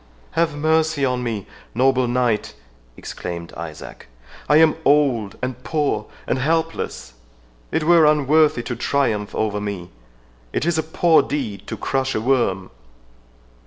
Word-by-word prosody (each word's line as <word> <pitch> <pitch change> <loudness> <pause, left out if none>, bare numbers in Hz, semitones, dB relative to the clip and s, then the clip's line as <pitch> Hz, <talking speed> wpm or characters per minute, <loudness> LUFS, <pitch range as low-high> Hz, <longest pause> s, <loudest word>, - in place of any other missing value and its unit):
"Have 165 -2 0
mercy 155 -1 +1
on 125 -1 -1
me, 115 -5 -3 0.3
noble 130 0 +3
knight!" 120 -3 0 0.4
exclaimed 85 -1 -7
Isaac; 80 -2 -9 0.4
"I 150 - +6
am 160 -1 +5
old, 135 -8 +2
and 125 0 -4
poor, 145 -9 -1 0.2
and 130 - -1
helpless. 160 - -2 0.6
It 160 - 0
were 165 -1 +6
unworthy 150 -3 +3
to 120 - -4
triumph 115 -5 -1
over 105 -1 -1
me—It - - -7
is 170 -2 +1
a - - +3
poor 160 +1 +3
deed 115 -9 -4
to - - -5
crush 135 0 -1
a - - +1
worm." 110 -6 0
130 Hz, 130 wpm, -21 LUFS, 105-150 Hz, 0.6 s, I